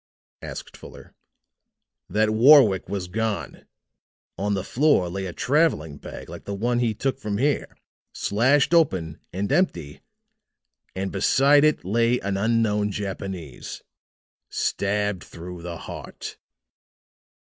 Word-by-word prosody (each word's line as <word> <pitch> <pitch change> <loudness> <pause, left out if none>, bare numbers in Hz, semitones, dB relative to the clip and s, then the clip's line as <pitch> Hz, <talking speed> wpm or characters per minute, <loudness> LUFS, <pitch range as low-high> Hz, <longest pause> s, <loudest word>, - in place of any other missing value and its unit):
asked - - -8
Fuller. - - -13 1.0
"That 110 +1 +2
Warwick 115 -5 +6
was 95 -2 -3
gone. 110 +2 -3 0.7
On 100 +1 -1
the 95 - -2
floor 135 - +2
lay 95 +2 -4
a - - -5
traveling 125 - +1
bag - - -9
like - - -10
the 100 - -4
one 120 +4 0
he 115 -3 0
took 135 +4 -2
from 105 -5 -3
here, 140 +4 -1 0.3
slashed 130 +9 +2
open 95 - +2
and 100 +5 -3
empty, 90 - 0 0.9
and 95 +1 -3
beside 140 +8 +4
it 155 -10 +2
lay 115 +5 +2
an 100 -1 -2
unknown 105 0 +1
Japanese 95 -8 -6 0.7
stabbed 105 -2 -1
through 90 +1 -9
the 85 -1 -6
heart. - - -8
105 Hz, 120 wpm, -24 LUFS, 95-125 Hz, 1.0 s, Warwick